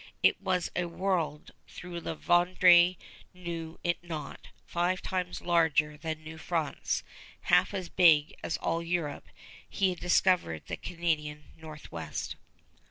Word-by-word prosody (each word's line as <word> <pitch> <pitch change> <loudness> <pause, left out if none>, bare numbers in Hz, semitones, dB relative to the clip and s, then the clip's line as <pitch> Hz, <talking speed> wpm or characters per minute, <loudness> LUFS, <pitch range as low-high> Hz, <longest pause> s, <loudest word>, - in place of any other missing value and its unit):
It - - +4
was 180 -2 0
a 180 - 0
world, 170 -4 -2 0.3
though 180 - -9
La 170 -2 -4
Vérendrye 175 +1 +5 0.4
knew 170 -2 -6
it 175 0 -1
not, 165 -3 -7 0.2
five 175 +2 0
times 180 -1 -3
larger 160 -3 +2
than 155 +1 -5
New 160 +1 -9
France, 165 -3 -2 0.4
half - - +3
as 185 -2 -4
big 160 -5 +5
as - - -1
all 165 +1 -1
Europe. 170 -3 -3 0.4
He 190 -2 +1
had 180 - -7
discovered 180 - +2
the - - -5
Canadian 155 -4 -3
Northwest. 150 - -7
170 Hz, 130 wpm, -30 LUFS, 155-180 Hz, 0.4 s, Vérendrye